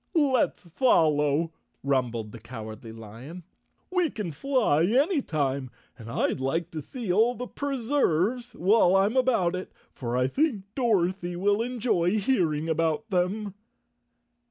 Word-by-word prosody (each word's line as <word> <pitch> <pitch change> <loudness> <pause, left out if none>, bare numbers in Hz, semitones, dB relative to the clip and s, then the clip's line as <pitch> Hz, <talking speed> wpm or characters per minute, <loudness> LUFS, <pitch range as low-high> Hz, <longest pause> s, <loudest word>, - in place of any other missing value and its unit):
"Let's 275 -6 +2
follow," 160 - +2 0.3
rumbled 120 -6 -1
the 115 - -10
Cowardly 110 -1 -9
Lion. 115 +10 -10 0.5
"We 360 -3 +2
can 205 -10 -5
fly 215 - +1
any 275 - +2
time, 140 - -2 0.3
and 115 -2 -11
I'd 115 - 0
like 165 +6 -1
to 155 - -5
see 225 - -4
all 230 +5 +3
the 250 - -5
Preserves 250 - 0
while 190 0 +4
I'm 200 +5 +3
about 230 -9 +2
it, 185 - -6 0.2
for 120 -1 -3
I 125 0 +2
think 255 - 0
Dorothy 190 -7 0
will 205 +4 +1
enjoy 225 -6 0
hearing 170 - +1
about 165 +7 0
them." 195 +3 0
180 Hz, 130 wpm, -27 LUFS, 145-240 Hz, 0.5 s, while